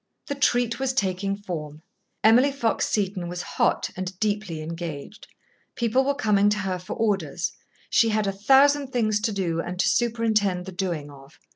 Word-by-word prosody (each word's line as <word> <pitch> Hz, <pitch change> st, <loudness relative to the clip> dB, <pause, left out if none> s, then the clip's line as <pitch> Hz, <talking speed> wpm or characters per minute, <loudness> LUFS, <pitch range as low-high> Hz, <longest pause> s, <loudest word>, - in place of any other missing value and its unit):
The -, -, -3 dB
treat 245 Hz, -4 st, +1 dB
was 265 Hz, -1 st, 0 dB
taking 195 Hz, -3 st, -1 dB
form. 155 Hz, -6 st, -7 dB, 0.4 s
Emily 245 Hz, +6 st, +6 dB
Fox 265 Hz, -5 st, 0 dB
Seton 195 Hz, -5 st, -1 dB
was 175 Hz, 0 st, -5 dB
hot -, -, 0 dB
and 185 Hz, 0 st, -5 dB
deeply 205 Hz, -6 st, -1 dB
engaged. 165 Hz, -, -7 dB, 0.5 s
People 235 Hz, +2 st, +2 dB
were 280 Hz, +1 st, 0 dB
coming 205 Hz, -6 st, +3 dB
to 210 Hz, -, 0 dB
her 190 Hz, -3 st, -2 dB
for 185 Hz, +3 st, -6 dB
orders. 195 Hz, -10 st, -1 dB, 0.4 s
She 230 Hz, -, +4 dB
had 215 Hz, -1 st, +1 dB
a 195 Hz, -, 0 dB
thousand 275 Hz, +7 st, +4 dB
things 215 Hz, -4 st, +1 dB
to 220 Hz, +1 st, -1 dB
do 180 Hz, -5 st, -1 dB
and 180 Hz, +1 st, -6 dB
to 190 Hz, -, +3 dB
superintend 215 Hz, -4 st, +1 dB
the 190 Hz, -, -7 dB
doing 175 Hz, -6 st, -3 dB
of. 140 Hz, +1 st, -16 dB
205 Hz, 170 wpm, -25 LUFS, 180-230 Hz, 0.5 s, Emily